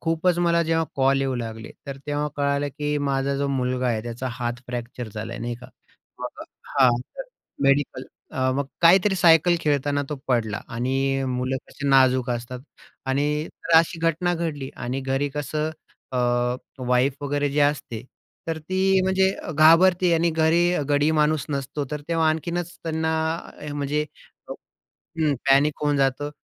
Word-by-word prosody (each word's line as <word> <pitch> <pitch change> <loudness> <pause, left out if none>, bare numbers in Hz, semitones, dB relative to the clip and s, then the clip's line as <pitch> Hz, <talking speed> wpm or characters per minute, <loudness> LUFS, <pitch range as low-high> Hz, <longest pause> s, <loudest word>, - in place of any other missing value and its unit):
खूपच 165 +2 +1
मला 170 -1 +3
जेव्हा 165 0 +1
कॉल 135 0 +3
येऊ 135 -1 0
लागले, 110 -2 -6 0.2
तर 140 - -5
तेव्हा 145 0 -1
कळालं 140 0 0
की 150 +1 -2
माझा 140 -1 0
जो 140 0 -1
मुलगा 130 -1 -1
आहे. 110 -2 -1
त्याचा 120 +2 -5
हात 120 0 -4
फ्रॅक्चर 120 -1 -5
झालाय, 110 0 -5
नाही 120 +1 -3
का? 125 - -11 0.5
मग - - -7
अ, - - -6 0.3
हां, 130 -2 +7 0.3
तर - - -4 0.4
मेडिकल 140 -1 +1 0.3
अ, 130 0 +1
मग 140 -1 -1 0.2
काहीतरी 190 +4 +6
सायकल 175 -1 +5
खेळताना 145 -1 +1
तो 150 - -3
पडला 110 -5 0
आणि 135 +3 0
मुलं 130 +1 -1
कशी 145 - -4
नाजूक 130 -2 +4
असतात 120 +1 -4 0.5
आणि 135 +2 +1 0.2
तर 165 - +1
अशी 165 +1 0
घटना 165 +2 +1
घडली 155 -5 -3
आणि 125 +3 -3
घरी 135 +2 -1
कसं 150 +1 -2 0.4
अ, - - +1 0.7
वाईफ 125 +2 +3
वगैरे 145 0 0
जे 145 +2 0
असते, 145 -6 0 0.4
तर 165 -1 -2
ती 190 +4 +1
म्हणजे 190 0 +3
अ, - - -7
घाबरते 170 +4 +5
आणि 165 +1 +2
घरी 160 +1 +3 0.3
गडी 145 +1 +3
माणूस 150 -2 +2
नसतो, 140 0 -3
तर 150 -1 -3
तेव्हा 165 -1 +2
आणखीनच 170 +2 -2
त्यांना 160 0 -1 0.5
अ, 150 -1 -6
म्हणजे 145 +1 -1 0.9
हं, 155 -3 -2 0.2
पॅनिक 145 +2 +3
होऊन 145 -1 +2
जातं 135 +1 0
145 Hz, 160 wpm, -24 LUFS, 130-160 Hz, 0.9 s, हां